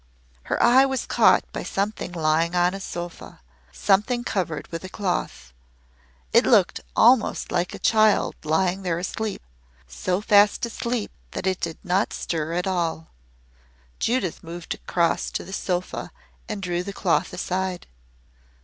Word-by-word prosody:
Her - - -1
eye 250 +3 +7
was 265 -2 -1
caught - - +4
by - - -3
something 200 -1 -3
lying 165 +1 +1
on 175 +1 +3
a 195 - -5
sofa 175 -2 -7 0.3
something 210 - +1
covered 175 -10 -2
with 165 +1 -6
a 185 - -7
cloth. 120 - -3 0.8
It - - +6
looked - - +3 0.2
almost 245 -1 +4
like 175 0 -1
a - - -7
child 215 -2 +4
lying 180 +5 +1
there 175 -3 -1
asleep 205 +4 -4 0.4
so 125 - -2
fast 205 +1 +4
asleep 235 -1 -3 0.2
that - - -4
it 185 -1 0
did 165 -2 -3
not 185 +2 +1
stir 160 -1 -3
at 180 +1 -1
all. 170 -4 -2 0.9
Judith 230 -8 -1
moved 170 +1 -6
across 170 -2 0
to - - -4
the 190 - -10
sofa 185 -2 -3 0.4
and 210 -2 -4
drew 175 -1 -1
the 200 +2 -6
cloth 180 0 +1
aside. 185 0 -3
185 Hz, 145 wpm, -24 LUFS, 170-205 Hz, 0.9 s, eye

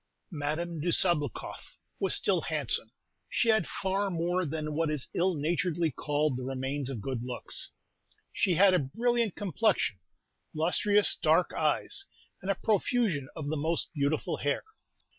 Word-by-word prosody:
Madame 160 +2 -2
de 155 - -3
Sabloukoff 150 - +1 0.2
was - - +3
still - - +2
handsome; - - -1 0.4
she 235 - +1
had 220 -6 +3
far 195 +1 -1
more 175 0 0
than 155 0 -3
what 160 +1 +1
is 150 -4 -2
ill 180 +1 +2
naturedly 165 +1 0
called 145 +2 0
the 130 - -4
remains 135 +1 -3
of 125 -6 -4
good 130 -3 -2
looks. 125 0 -3 0.6
She 180 - +2
had 190 +2 +6
a 180 - +4
brilliant 230 - 0
complexion, 200 - +1 0.6
lustrous 200 +6 +3
dark - - +3
eyes, 395 - 0 0.4
and 190 - -5
a 195 - +3
profusion 205 - +1
of 150 -3 -4
the 155 - -1
most 160 +4 -1
beautiful 145 0 0
hair. 145 0 -1
165 Hz, 145 wpm, -30 LUFS, 145-190 Hz, 0.6 s, had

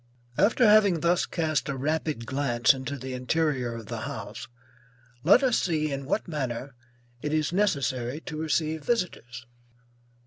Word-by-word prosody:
After 230 - +4
having 205 -6 +5
thus 170 +1 +2
cast 155 -2 -1
a 135 - -2
rapid 150 -3 -2
glance 120 -3 +2
into 135 +1 -5
the 130 0 -6
interior 130 -2 0
of 115 -1 -8
the - - -5
house, - - -6 0.8
let 200 - +6
us 250 -3 +3
see 155 -4 0
in 140 0 -4
what 210 - -1
manner 135 -4 -4 0.5
it 150 - -2
is 155 +1 0
necessary 140 -9 0
to 165 - -7
receive 160 0 -1
visitors. 125 - -2
150 Hz, 145 wpm, -27 LUFS, 130-170 Hz, 0.8 s, let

